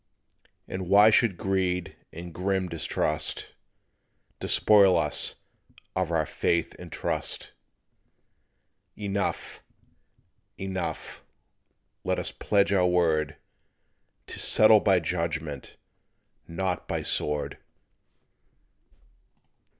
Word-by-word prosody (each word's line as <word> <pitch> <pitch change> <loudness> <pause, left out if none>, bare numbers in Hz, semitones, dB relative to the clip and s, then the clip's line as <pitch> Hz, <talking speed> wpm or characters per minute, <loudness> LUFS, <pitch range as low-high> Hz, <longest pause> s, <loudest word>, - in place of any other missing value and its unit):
"And 95 -1 -5
why 105 +3 +7
should 105 -5 +3
greed 90 -2 -1 0.2
and 85 0 -9
grim 95 +1 -1
distrust 80 -2 -2 0.9
Despoil 100 -3 +5
us - - -1 0.6
of 95 -3 0
our 80 -2 +1
faith 85 +3 -1
and - - -10
trust? - - -3 1.4
Enough, 100 -1 -3 1.0
enough, 95 -5 -5 0.8
let - - 0
us - - -3
pledge 100 -1 +1
our 90 -2 +3
word 80 -4 +1 0.9
To - - -8
settle 110 0 +6
by 95 -3 +3
judgment, 80 -3 -4 0.7
not 90 +1 -3
by - - -2
sword. 75 0 -1
90 Hz, 85 wpm, -27 LUFS, 85-95 Hz, 1.4 s, why